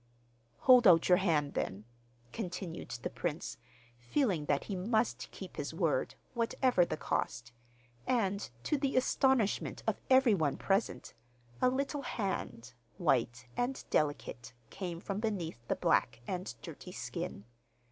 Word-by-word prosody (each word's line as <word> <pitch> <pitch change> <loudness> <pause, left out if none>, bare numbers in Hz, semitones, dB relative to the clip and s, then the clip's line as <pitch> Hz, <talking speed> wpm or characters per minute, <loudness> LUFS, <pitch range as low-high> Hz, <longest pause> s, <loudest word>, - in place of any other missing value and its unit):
'Hold 250 -3 +7
out 170 -1 +6
your 180 +1 +7
hand 150 -6 +1
then,' 100 +3 -3 0.5
continued 180 -4 -5
the - - -1
prince, 165 -7 -3 0.4
feeling 180 - 0
that 145 -1 +1
he 200 - -4
must 220 +5 0
keep - - -10
his - - -4
word, - - 0 0.2
whatever 235 -3 +2
the 170 - -2
cost, 120 -5 -2 0.6
and, 200 -5 +1
to 300 - +1
the 275 -2 0
astonishment 255 -4 +2
of - - -1
every 260 -3 +6
one 155 -7 +1
present, 195 +3 0 0.5
a 255 - +5
little 275 +2 -1
hand, 195 - -3 0.2
white 125 - +1
and 250 +2 -1
delicate, 125 -5 -1 0.2
came 180 -4 -4
from 195 +2 -3
beneath 170 - -3
the - - +1
black 115 -1 +2
and 185 0 -3
dirty 170 +2 -8
skin. 170 - -5
190 Hz, 135 wpm, -33 LUFS, 155-240 Hz, 0.6 s, Hold